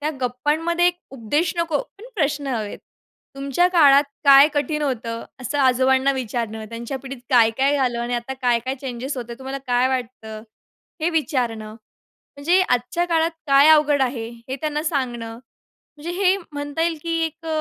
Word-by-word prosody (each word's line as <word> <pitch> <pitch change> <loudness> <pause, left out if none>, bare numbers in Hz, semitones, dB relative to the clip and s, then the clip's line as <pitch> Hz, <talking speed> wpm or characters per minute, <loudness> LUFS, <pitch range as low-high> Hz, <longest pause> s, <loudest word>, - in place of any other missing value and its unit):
त्या 300 +1 -1
गप्पांमध्ये 305 +8 0
एक 355 - +2 0.2
उपदेश 280 +7 -1
नको, 335 -3 0 0.2
पण 435 - -12
प्रश्न 295 -5 -1
हवेत. 225 -6 -3 0.6
तुमच्या 275 +5 +1
काळात 290 -5 +6 0.2
काय 280 +1 +8
कठीण 300 +1 -1
होतं? 230 -4 -3 0.2
असं 275 +3 -3
आजोबांना 265 +1 +3
विचारणं, 230 -3 -4
त्यांच्या 235 +3 -5
पिढीत 270 -1 -9
काय-काय 255 +3 +3
झालं 250 -4 0
आणि 240 +1 -2
आता 240 +2 -4
काय-काय 245 +1 +1
चेंजेस 265 +1 -5
होते, 240 -1 -6
तुम्हाला 265 +1 -5
काय 245 +1 +2
वाटतं? 230 -4 -5 0.6
हे 320 - +1
विचारणं. 240 -9 -2 0.6
म्हणजे 340 +6 +3
आजच्या 250 +4 0
काळात 330 -1 +1 0.2
काय 280 +1 +6
अवघड 300 -2 +5
आहे, 240 -3 -2 0.2
हे 265 - -3
त्यांना 300 -1 -2
सांगणं, 245 -7 -3 0.6
म्हणजे 305 +3 -6
हे 380 0 +4 0.2
म्हणता 290 +2 -3
येईल 330 -2 0
की 335 -1 -2
एक 325 +1 -7
275 Hz, 155 wpm, -22 LUFS, 245-300 Hz, 0.6 s, काय